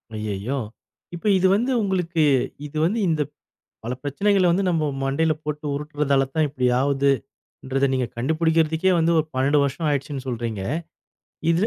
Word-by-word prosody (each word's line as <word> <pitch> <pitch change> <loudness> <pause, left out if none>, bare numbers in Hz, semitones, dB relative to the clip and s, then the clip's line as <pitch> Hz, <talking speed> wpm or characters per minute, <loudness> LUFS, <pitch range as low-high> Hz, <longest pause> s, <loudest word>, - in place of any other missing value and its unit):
ஐயையோ. 105 +5 -3 0.6
இப்ப 170 - -10
இது 185 - +3
வந்து 245 +5 0
உங்களுக்கு 175 -5 0 0.4
இது 155 - -7
வந்து 215 +7 0
இந்தப் 155 -3 -1 0.5
பல 120 - -2
பிரச்சனைகள 195 +7 +2
வந்து 190 +3 +2
நம்ப 165 -3 +1 0.2
மண்டையில 140 +4 +1
போட்டு 150 0 -4
உருட்டுறதால 145 -2 0
தான் 155 - +3
இப்டி 130 -3 -1
ஆவுதுன்றத 135 0 -1
நீங்கக் 125 -1 -2
கண்டுபிடிக்குறதுக்கே 160 +5 +2
வந்து 165 +1 +3
ஒரு 155 - +1
12 140 +3 +3
வருஷம் 140 +4 -2
ஆயிடுச்சுன்னு 140 -1 -3
சொல்றீங்க. 115 -5 -3 0.9
இதுல 170 +6 +2
150 Hz, 140 wpm, -23 LUFS, 135-165 Hz, 0.9 s, இது